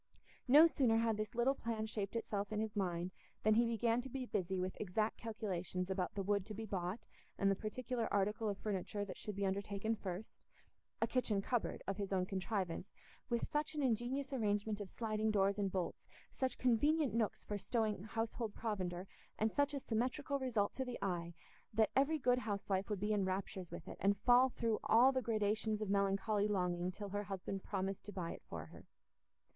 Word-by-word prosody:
No 295 +6 +9
sooner 260 -8 +3
had 225 -1 +2
this 215 +2 -3
little 240 +3 +4
plan 225 -4 -2
shaped 210 -1 -3
itself 205 -2 -2
in 210 - 0
his 220 -1 -2
mind 180 -2 -1 0.3
than 215 - +5
he 235 +2 +4
began 230 +1 +2
to 265 - -8
be 260 0 -3
busy 190 -4 -1
with 185 +1 -2
exact 215 +2 0
calculations 185 -5 -3
about 185 -2 -1
the 200 - -1
wood 200 0 +2
to 215 - -6
be 220 +2 -4
bought 190 +1 -2 0.4
and 195 0 +3
the - - +2
particular 235 +3 -3
article 210 +2 +1
of 200 - -2
furniture 205 0 -2
that 190 - -6
should 210 - -5
be 200 0 0
undertaken 200 +3 -1
first—a 195 0 -7
kitchen 230 -5 +1
cupboard 235 +4 -1
of 195 0 -2
his 200 -2 -3
own 185 -1 +2
contrivance, 190 -1 -2 0.4
with 235 -1 0
such 300 +1 -1
an 295 - 0
ingenious 260 +3 0
arrangement 210 -3 0
of 200 - -5
sliding 220 0 -1
doors 200 -1 +3
and 195 -2 +1
bolts, 180 -2 -3 0.3
such 260 -1 -1
convenient 285 +4 +3
nooks 225 -2 0
for 205 -1 -3
stowing 215 -2 0
household 225 +1 -3
provender, 185 -5 -2 0.3
and 220 +1 +2
such 285 +4 +2
a 285 - -2
symmetrical 260 +4 -1
result 230 -6 +1
to 265 - -2
the 250 -2 -4
eye, 170 -3 -2 0.4
that 220 -1 +3
every 280 +4 +4
good 250 -3 +3
housewife 200 -3 -1
would 205 -3 -1
be 210 +2 +1
in 205 -2 +2
raptures 185 -1 -2
with - - -8
it, - - -7
and 200 +1 +3
fall 245 +5 +6
through 230 -3 0
all 245 +4 +6
the 260 -1 0
gradations 215 -1 +1
of 210 -2 -2
melancholy 200 +1 +2
longing 180 -3 0
till 205 +2 -6
her 205 +1 -2
husband 195 0 -4
promised 195 -1 -2
to 205 - -7
buy 180 -4 -3
it - - -8
for - - -5
her. - - -14
210 Hz, 195 wpm, -38 LUFS, 195-230 Hz, 0.4 s, No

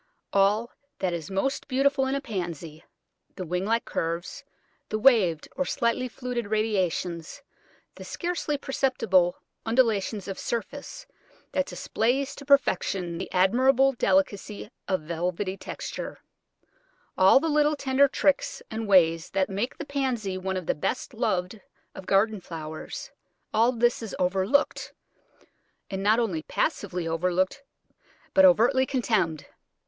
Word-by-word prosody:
All 205 +4 +3 0.3
that 185 -2 -1
is 165 -3 -5
most 195 +8 -1
beautiful 275 0 +2
in 265 - 0
a 275 - -2
Pansy, 170 - -5 0.5
the 185 - -5
wing 180 +3 -2
like 230 +2 +1
curves, 170 +1 -3 0.5
the 215 - -1
waved 210 - +4
or 275 - 0
slightly 255 -1 0
fluted 245 -2 -4
radiations, 190 - -1 0.5
the - - -10
scarcely 345 -4 -2
perceptible 225 -10 +1 0.3
undulation 225 -3 +2
of 195 - -5
surface 285 - -5 0.5
that 280 0 0
displays 270 0 -1
to 280 - -11
perfection 190 -10 +2
the - - -6
admirable 255 +8 +4
delicacy 200 -1 0 0.2
of 185 -3 0
velvety 175 +4 -2
texture; - - -6 1.0
all 190 +7 +6
the 325 - -2
little 300 0 +3
tender 275 0 +3
tricks 285 +1 0
and 220 0 -3
ways 165 -3 +4
that 195 0 0
make 205 +6 -2
the 320 - -6
Pansy 255 -9 -2
one 190 0 -3
of 185 - -5
the - - +1
best 250 - -3
loved 215 -3 -1 0.3
of 190 - -10
garden 205 +1 +2
flowers; 160 -2 -7 0.4
all 230 +3 +4
this 240 0 +1
is 225 -3 -6
overlooked, 190 +9 +1 1.0
and 190 0 -3
not 210 +3 +4
only 200 -10 0
passively 175 +2 -2
overlooked, 180 +8 0 0.7
but 285 -1 +7
overtly 260 0 +5
contemned. 200 - 0
215 Hz, 130 wpm, -26 LUFS, 185-260 Hz, 1.0 s, but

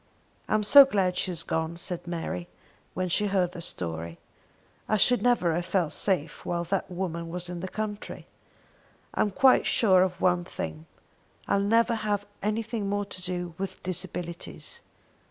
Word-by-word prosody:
"I - - +3
am 215 - +1
so 280 +7 +10
glad 195 -9 0
she 185 - 0
has 175 -3 -1
gone," 160 +1 -2
said 175 0 -4
Mary, 165 - -4 0.5
when 185 +2 -1
she 205 +4 +2
heard 185 -3 +1
the 175 - -8
story. 85 - -4 0.7
"I 215 - +3
should 245 +4 +3
never 240 -9 +3
have 175 +2 -2
felt 180 -5 0
safe 180 -6 +1
while 170 0 -2
that 195 +4 -2
woman 170 -2 -4
was 175 +1 -5
in 175 -1 -5
the 185 - -4
country. 210 +1 -5 0.9
I'm 210 - +1
quite 260 +6 +4
sure 190 -5 +4
of 185 -1 0
one 180 -1 +2
thing. 80 - -6 0.6
I'll 200 - +2
never 230 +4 +3
have 210 -2 -1 0.2
anything 215 0 -2
more 205 0 -1
to 185 -2 -9
do 180 -1 -4
with 190 -1 -5
disabilities. 180 -1 -5
185 Hz, 165 wpm, -27 LUFS, 170-205 Hz, 0.9 s, so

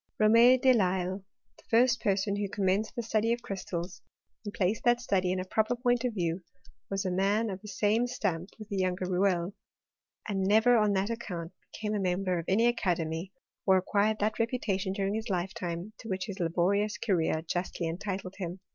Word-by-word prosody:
Rome 230 +4 +6
de 260 0 +5
Lisle, 190 -2 0 0.4
the - - -19
first 245 +1 +4
person 200 0 +1
who 205 -1 -2
commenced 200 +1 0
the 235 - -2
study 225 0 +1
of 235 0 -5
crystals, 185 -3 -5 0.5
anil 205 - -5
placed 200 +3 0
that 240 0 +4
study 190 -6 0
in 185 - -1
a 185 - -3
proper 220 +5 +1
point 245 0 +1
of 245 -3 -1
view, 170 -1 -1 0.5
was 195 0 -2
a 185 - 0
mail 200 +4 +1
of 190 0 -6
the 210 - -11
same 210 +4 +1
stamp 190 -7 -2
with 215 -2 -9
the 200 - -3
younger 185 -1 0
Rouelle, 180 0 +1 0.7
anS 195 -3 -1
never 220 +4 +5
on 210 -2 +3
that 195 +3 0
account, 180 -8 -5 0.2
became 215 -1 -3
a 210 - 0
member 185 -1 0
of 165 - -6
any 215 +5 +3
aca« 230 -7 +2
demy, 165 +3 -4 0.4
or 190 -1 +6
acquired 205 +3 +1
that 215 +2 -1
reputation 215 -5 -1
during 195 0 -1
his 220 +1 -3
lifetime/ 180 +1 -3
to 225 - -9
which 190 0 -2
his 200 -2 -7
laborious 185 +5 +1
career 165 -6 0
justly 175 +1 -3
entitled 185 +2 -4
him. 180 -1 -5
195 Hz, 190 wpm, -29 LUFS, 185-220 Hz, 0.7 s, Rome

